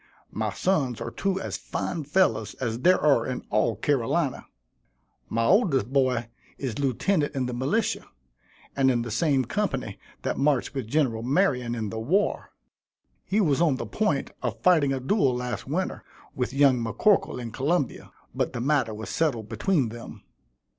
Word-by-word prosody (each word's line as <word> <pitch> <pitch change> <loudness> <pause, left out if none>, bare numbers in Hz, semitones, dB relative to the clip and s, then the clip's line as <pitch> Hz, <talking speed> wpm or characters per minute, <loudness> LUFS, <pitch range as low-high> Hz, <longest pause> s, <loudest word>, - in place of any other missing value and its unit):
My - - -2
sons 140 - 0
are - - -5
two 195 -1 -1
as - - -4
fine 160 -4 -4
fellows 185 +6 +1
as 115 -2 -3
there 180 +7 +4
are 140 -6 +4
in 130 -1 -4
all 110 +1 +2
Carolina. 135 - 0 0.8
My 115 0 0
oldest 140 - +3
boy 130 -4 +2 0.3
is 130 -4 -4
lieutenant 145 - 0
in 130 -2 0
the 125 - -3
militia, 205 - -1 0.7
and 135 -1 +3
in 120 -2 +1
the 120 - -6
same 135 +2 +2
company 135 - -2 0.2
that - - -2
marched 140 -1 +1
with 135 -5 -4
Gen. 140 -1 +2 0.2
Marion 125 -9 +2
in 110 -3 -3
the 110 - -4
war. 185 - 0 0.8
He 200 +3 +1
was 160 -7 +2
on 160 -6 +3
the - - -4
point 155 -11 -1
of - - -3
fighting 160 -6 +4
a 135 - -1
duel 135 - +2
last 125 0 -4
winter, 180 +7 -2 0.3
with 125 -1 -2
young 135 -2 +4
M'Corkle 115 - +2
in 120 -2 -6
Columbia; 145 +3 -1 0.2
but - - -1
the 120 - -3
matter 130 -4 +1
was 105 -2 -6
settled 120 -10 0
between 130 - +1
them. 115 +1 -10
135 Hz, 165 wpm, -26 LUFS, 120-160 Hz, 0.8 s, there